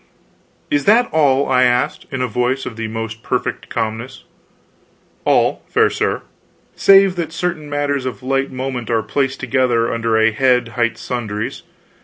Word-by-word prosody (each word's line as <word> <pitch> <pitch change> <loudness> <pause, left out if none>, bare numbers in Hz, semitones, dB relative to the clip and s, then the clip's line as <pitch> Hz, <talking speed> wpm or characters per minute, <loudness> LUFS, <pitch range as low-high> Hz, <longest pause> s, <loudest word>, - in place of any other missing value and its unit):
"Is 145 -1 +1
that 235 +4 +5
all?" 140 -3 +3
I 130 -1 +3
asked, 125 0 +1
in 130 -2 -2
a - - 0
voice 125 +4 -1
of 115 - -6
the 115 0 -4
most 110 0 -5
perfect 125 0 -3
calmness. 115 +2 -4 1.0
"All, - - +2
fair - - +3
sir, - - -1 0.5
save 195 -1 +5
that 165 -2 -3
certain 165 -3 -3
matters 145 -2 -1
of 130 0 -6
light 135 +1 0
moment 130 -2 -4
are 115 -2 +1
placed 135 -2 -1
together 125 -2 +1
under 115 -1 0
a 110 +1 +4
head 125 0 +2
hight 115 -1 -1
sundries. 110 -4 -4
125 Hz, 155 wpm, -18 LUFS, 115-140 Hz, 1.0 s, that